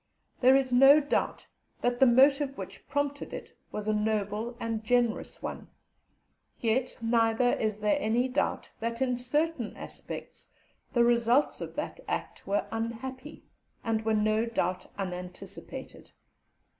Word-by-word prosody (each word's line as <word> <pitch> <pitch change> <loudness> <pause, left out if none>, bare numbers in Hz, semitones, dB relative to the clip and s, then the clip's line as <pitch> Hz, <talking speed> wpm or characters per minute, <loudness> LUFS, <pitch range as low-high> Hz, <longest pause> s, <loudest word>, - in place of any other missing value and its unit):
There 260 +1 +6
is 265 -2 +2
no 270 +4 +8
doubt 290 -1 -1 0.4
that 245 0 0
the 265 - +7
motive 275 +3 +4
which - - -8
prompted 285 0 -2
it - - -9 0.2
was 210 0 -5
a 215 - +2
noble 215 +2 -1
and 225 -2 -3
generous 240 0 0
one; - - -5 0.9
yet 245 +3 0
neither 230 +1 +3
is 215 -1 -1
there 210 +6 +3
any 240 +1 +1
doubt, 260 +2 -1
that 230 +1 -3
in 255 -2 +1
certain 255 0 -1
respects, - - -8 0.4
the 240 - +4
results 235 +3 +3
of - - -6
that - - -4
act - - -4
were 200 +1 +1
unhappy, 255 +5 -5 0.4
and 225 -1 0
were 220 0 +2
no 215 +2 +2
doubt 185 -5 -1
unanticipated. 180 -2 -7
235 Hz, 135 wpm, -29 LUFS, 220-260 Hz, 0.9 s, no